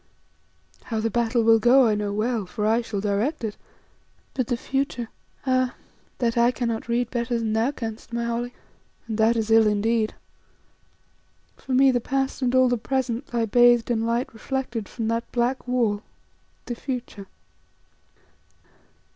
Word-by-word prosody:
How 225 -2 -2
the 225 +1 -1
battle 235 +1 +1
will 225 0 +6
go 250 +4 +6
I 220 - +3
know 205 -1 -1
well, 215 0 -1
for 210 +3 -3
I 225 +2 +3
shall 215 -4 -4
direct 215 +9 -1
it, 215 -2 -3 0.8
but 255 -3 -1
the 245 - 0
future 270 -3 -2 0.4
ah! 255 -1 +1 0.4
that 235 -1 +1
I 235 +1 +5
cannot 230 -3 -2
read 240 0 0
better 240 0 -1
than 225 -2 -1
thou 225 +3 +2
canst, 225 -5 -6
my 235 0 -2
Holly, 235 +1 -2 0.6
and 220 -1 -4
that 225 +2 +4
is 225 0 -1
ill 225 -1 +6
indeed. 215 +1 +1 1.4
For 265 - -6
me 270 +1 +6
the 245 -1 0
past 270 +2 -2
and 255 0 +1
all 255 0 +6
the 245 -1 0
present 260 +1 -2
lie 235 -1 +1
bathed 240 +1 +4
in 225 -1 +1
light 235 +2 -1
reflected 240 -2 -4
from 225 -2 -4
that 230 +1 -2
black 245 +1 -1
wall 230 -5 +1 0.6
the 240 - -3
future." 235 -5 -6
235 Hz, 160 wpm, -24 LUFS, 225-250 Hz, 1.4 s, will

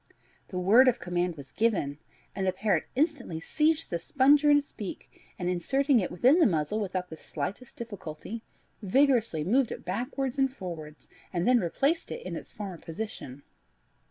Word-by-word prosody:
The 185 - -6
word 215 +9 +6
of 250 - +3
command 175 -1 -1
was 140 -2 -11
given, 180 -11 0 0.4
and 190 -1 -1
the - - +4
parrot 185 -3 0
instantly 265 - 0
seized 310 - +1
the 170 - -1
sponger 285 - +4
in 290 - +7
its 290 0 -3
beak, 205 -4 -8 0.2
and 175 - -3
inserting 265 - +2
it 185 - -1
within 260 - +4
the 330 - +6
muzzle 160 +2 0
without 185 -3 -3
the 160 - -7
slightest 175 - -6
difficulty, 205 -1 -7 0.4
vigorously 230 - +3
moved 240 - +2
it - - -7
backwards 250 +7 -2
and 270 -1 +3
forwards, 165 - -8 0.2
and 175 -1 -1
then 250 -1 +6
replaced 275 - 0
it 480 +1 -6
in - - -4
its - - -8
former 195 -5 -7
position. 160 -7 -7
210 Hz, 170 wpm, -28 LUFS, 175-265 Hz, 0.4 s, in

